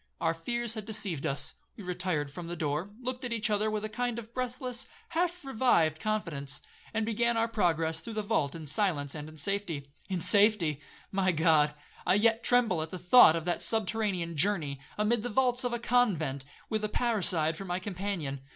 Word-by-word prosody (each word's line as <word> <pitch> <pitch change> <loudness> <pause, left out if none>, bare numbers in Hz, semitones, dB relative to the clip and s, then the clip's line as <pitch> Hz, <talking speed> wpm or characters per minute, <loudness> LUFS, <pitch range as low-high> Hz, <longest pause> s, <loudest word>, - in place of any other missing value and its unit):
Our 165 0 +1
fears 235 +7 -2
had 215 -3 -6
deceived 190 -8 -2
us; 140 0 -2 0.2
we 210 - -8
retired 180 -5 -2
from 170 +3 -7
the 175 - -4
door, 155 +3 -2
looked 255 +1 -4
at 245 - -3
each 230 -1 0
other 210 +1 +1
with 215 0 -2
a - - -1
kind 245 +1 -2
of 230 0 -8
breathless, 255 0 -4 0.2
half 350 -1 -1
revived 215 - +2
confidence, 160 -9 -2 0.3
and 220 0 -1
began 235 +1 +1
our 225 0 +2
progress 165 -7 +1
through 220 +8 -8
the 215 - -1
vault 170 -10 0
in 160 -2 -7
silence 150 -3 0
and 150 0 -7
in 155 - -14
safety. 175 -4 -2 0.2
In 185 -2 -1
safety! 180 -5 +4 0.3
my 190 -1 +2
God! 155 -2 +3 0.3
I 180 - +3
yet 225 +2 +3
tremble 235 -9 +3
at 160 - -4
the 185 - -6
thought 180 0 +7
of 165 -1 -3
that 175 - 0
subterranean 205 -6 0
journey, 155 -6 0 0.2
amid 215 +2 +2
the 245 - -3
vaults 250 +1 +2
of 245 - -1
a 240 - -1
convent, 185 - +1 0.2
with 215 -1 -2
a 215 - 0
parricide 185 -10 +1
for 195 - -7
my 180 -1 -2
companion. 185 -7 -4
200 Hz, 195 wpm, -30 LUFS, 160-230 Hz, 0.3 s, thought